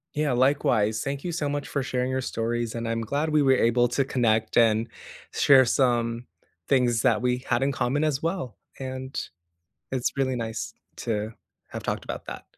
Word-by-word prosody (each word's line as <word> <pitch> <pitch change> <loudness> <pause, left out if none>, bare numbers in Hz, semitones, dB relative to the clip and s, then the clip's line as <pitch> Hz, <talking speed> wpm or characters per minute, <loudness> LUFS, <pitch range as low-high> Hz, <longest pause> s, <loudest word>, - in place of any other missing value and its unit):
Yeah, 150 -1 +1
likewise. 120 -5 +2
Thank 140 0 -4
you 180 - -2
so 160 -3 -2
much 145 0 -3
for 140 - -2
sharing 125 -1 -1
your 130 0 -1
stories, 115 -1 -2
and 115 0 -4
I'm 115 0 -1
glad 140 +8 -1
we 150 -1 +3
were 135 -1 +5
able 120 0 +3
to 135 +3 +1
connect 110 -5 +1
and 115 0 +4 0.4
share 135 -2 +6
some 120 -2 +1 0.4
things 125 -4 +2
that 110 -1 +3
we 125 0 0
had 120 +1 +1
in 135 +1 +2
common 140 +3 0
as 150 -3 0
well, 165 - -3 0.2
and 130 0 -5 0.7
it's 130 -2 -1
really 130 -2 0
nice 115 -1 -4 0.3
to 110 -1 -2 0.4
have - - -6
talked - - -3
about - - -6
that. - - -7
125 Hz, 180 wpm, -26 LUFS, 115-140 Hz, 0.7 s, share